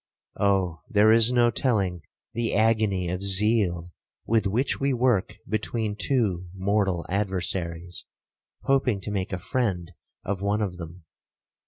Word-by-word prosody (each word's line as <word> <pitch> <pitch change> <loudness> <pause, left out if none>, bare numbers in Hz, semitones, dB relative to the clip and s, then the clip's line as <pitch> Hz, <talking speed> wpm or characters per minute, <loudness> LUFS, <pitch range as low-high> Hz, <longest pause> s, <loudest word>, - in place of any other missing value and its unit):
Oh! 95 -4 +1
there 110 -2 +5
is 115 +1 +5
no 120 -1 +3
telling 100 -9 0 0.3
the 115 -1 -1
agony 110 -4 +2
of 90 +2 -3
zeal 100 -3 +2 0.3
with 110 -2 +1
which 120 +8 0
we 140 0 +1
work 120 -4 +1
between 110 0 -2
two 105 -8 0
mortal 95 -2 0
adversaries, 90 -3 -3 0.6
hoping 135 -6 +1
to 105 - -5
make 95 -2 -3
a 95 - -2
friend 95 -3 -2 0.3
of 95 -1 -3
one 105 +2 0
of 90 -3 -4
them! 85 +1 -10
100 Hz, 135 wpm, -25 LUFS, 90-115 Hz, 0.6 s, there